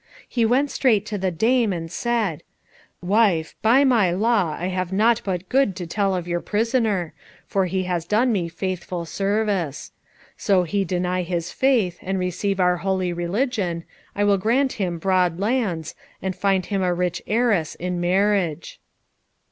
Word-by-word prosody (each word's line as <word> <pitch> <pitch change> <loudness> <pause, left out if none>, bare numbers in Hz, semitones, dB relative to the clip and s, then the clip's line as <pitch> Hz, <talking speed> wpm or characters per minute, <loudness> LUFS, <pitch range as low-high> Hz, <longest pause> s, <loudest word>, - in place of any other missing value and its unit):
He 235 -2 +1
went 270 +5 +2
straight 220 -6 +2
to 210 -1 -4
the 190 0 0
dame, 225 +5 +2
and 165 -2 -4
said, 215 -9 -1 0.6
"Wife, 185 -5 +2
by 240 +6 +5
my 235 -9 +4
law 195 -3 +1
I 175 - -3
have 185 -1 -2
naught 225 +4 +3
but 185 -2 -3
good 260 -7 +2
to 180 - -5
tell 195 +2 0
of 175 -1 -4
your 175 0 -1
prisoner, 215 -5 0 0.3
for 195 -2 0
he 185 +1 -1
has 175 -2 -2
done 230 +7 +2
me 180 -6 -1
faithful 180 -1 -4
service. 195 -4 -1 0.4
So 195 -4 +2
he 195 +4 0
deny 180 +1 -1
his 175 -1 -3
faith, 230 -10 +1
and 190 +1 -2
receive 185 +2 -2
our 180 -1 +3
holy 185 0 -1
religion, 180 -1 -1 0.3
I 205 - +1
will 200 -1 +3
grant 255 +7 +1
him 180 -5 -2
broad 180 -1 +1
lands, 200 - -1 0.3
and 190 -1 -3
find 195 -2 +1
him 195 -1 -1
a 180 -1 +1
rich 180 -1 -1
heiress 215 -8 +1
in 180 0 -3
marriage." 180 -3 0
190 Hz, 165 wpm, -23 LUFS, 175-215 Hz, 0.6 s, by